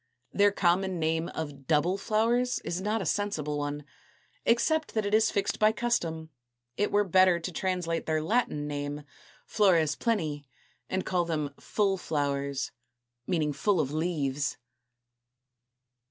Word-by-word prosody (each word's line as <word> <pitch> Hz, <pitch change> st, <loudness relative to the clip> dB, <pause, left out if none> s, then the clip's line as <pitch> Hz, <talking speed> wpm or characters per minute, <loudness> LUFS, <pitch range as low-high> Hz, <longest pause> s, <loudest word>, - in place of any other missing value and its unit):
Their 205 Hz, 0 st, +4 dB
common 185 Hz, 0 st, +1 dB
name 160 Hz, +1 st, 0 dB
of 145 Hz, -4 st, -6 dB
double 160 Hz, +4 st, +2 dB
flowers 230 Hz, +5 st, +1 dB
is 175 Hz, +2 st, -2 dB
not 210 Hz, +1 st, 0 dB
a -, -, -6 dB
sensible 155 Hz, -7 st, -1 dB
one: 145 Hz, 0 st, -3 dB, 0.6 s
except 310 Hz, +6 st, +2 dB
that 215 Hz, -2 st, +1 dB
it 205 Hz, -, -2 dB
is 220 Hz, 0 st, +5 dB
fixed 200 Hz, -, -1 dB
by 215 Hz, 0 st, +5 dB
custom, 170 Hz, -9 st, -2 dB, 0.4 s
it 205 Hz, -, 0 dB
were 205 Hz, 0 st, +4 dB
better 185 Hz, -2 st, +4 dB
to 170 Hz, +2 st, -5 dB
translate 180 Hz, -2 st, -2 dB
their 155 Hz, 0 st, +1 dB
Latin 160 Hz, -4 st, 0 dB
name, 145 Hz, 0 st, -4 dB, 0.4 s
flores 170 Hz, -8 st, +3 dB
pleni, 155 Hz, -11 st, -1 dB, 0.4 s
and 190 Hz, 0 st, -1 dB
call 180 Hz, -2 st, +1 dB
them 150 Hz, -4 st, -2 dB
full 195 Hz, -3 st, 0 dB
flowers, 140 Hz, -3 st, -2 dB, 0.6 s
meaning 155 Hz, -5 st, 0 dB
full 190 Hz, +6 st, +1 dB
of 140 Hz, -3 st, 0 dB
leaves. 145 Hz, -4 st, -1 dB
170 Hz, 140 wpm, -29 LUFS, 150-205 Hz, 0.6 s, is